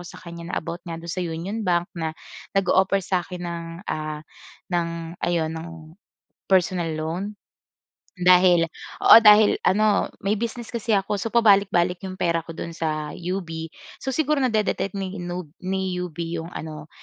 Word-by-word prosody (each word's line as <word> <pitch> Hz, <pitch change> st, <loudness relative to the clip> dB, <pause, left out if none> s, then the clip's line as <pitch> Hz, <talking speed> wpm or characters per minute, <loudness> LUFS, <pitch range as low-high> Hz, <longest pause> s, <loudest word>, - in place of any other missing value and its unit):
sa -, -, -11 dB
kanya 170 Hz, 0 st, -9 dB
na -, -, -3 dB
about 170 Hz, +2 st, -4 dB
nga 165 Hz, -, -4 dB
do'n 170 Hz, +1 st, -6 dB
sa 185 Hz, -, -3 dB
Union 175 Hz, +5 st, -3 dB
Bank 175 Hz, -3 st, 0 dB
na 160 Hz, -2 st, -4 dB, 0.4 s
nag-o-offer 195 Hz, 0 st, +3 dB
sa 185 Hz, -1 st, +1 dB
akin 180 Hz, 0 st, -8 dB
ng 170 Hz, -1 st, -4 dB, 0.2 s
ah, 155 Hz, 0 st, -4 dB, 0.5 s
ng 170 Hz, -1 st, +1 dB, 0.3 s
ayun, 165 Hz, -2 st, 0 dB
ng 165 Hz, +1 st, -6 dB, 0.8 s
personal 185 Hz, -2 st, +2 dB
loan. 160 Hz, +4 st, -3 dB, 0.9 s
Dahil 180 Hz, -1 st, +6 dB, 0.4 s
oo, -, -, +11 dB
dahil 210 Hz, 0 st, +7 dB
ano, 210 Hz, +1 st, +3 dB, 0.2 s
may 200 Hz, -, +3 dB
business 235 Hz, +2 st, -4 dB
kasi 230 Hz, -2 st, +1 dB
ako 195 Hz, 0 st, -2 dB
so 225 Hz, -, -2 dB
pabalik-balik 200 Hz, -6 st, +3 dB
'yong 185 Hz, -1 st, -6 dB
pera 170 Hz, -3 st, +1 dB
ko 165 Hz, 0 st, -10 dB
do'n 170 Hz, -, -5 dB
sa 155 Hz, -2 st, -3 dB
UB. 180 Hz, +2 st, -3 dB, 0.6 s
So 265 Hz, -, -3 dB
siguro 300 Hz, +1 st, +1 dB
na-de-detect 215 Hz, -5 st, 0 dB
ni 190 Hz, -1 st, -4 dB
nub 175 Hz, -3 st, -6 dB
ni 190 Hz, 0 st, -2 dB
UB 175 Hz, -3 st, -6 dB, 0.2 s
'yong 165 Hz, 0 st, -4 dB
ano, 155 Hz, -1 st, -8 dB
180 Hz, 160 wpm, -24 LUFS, 170-200 Hz, 0.9 s, oo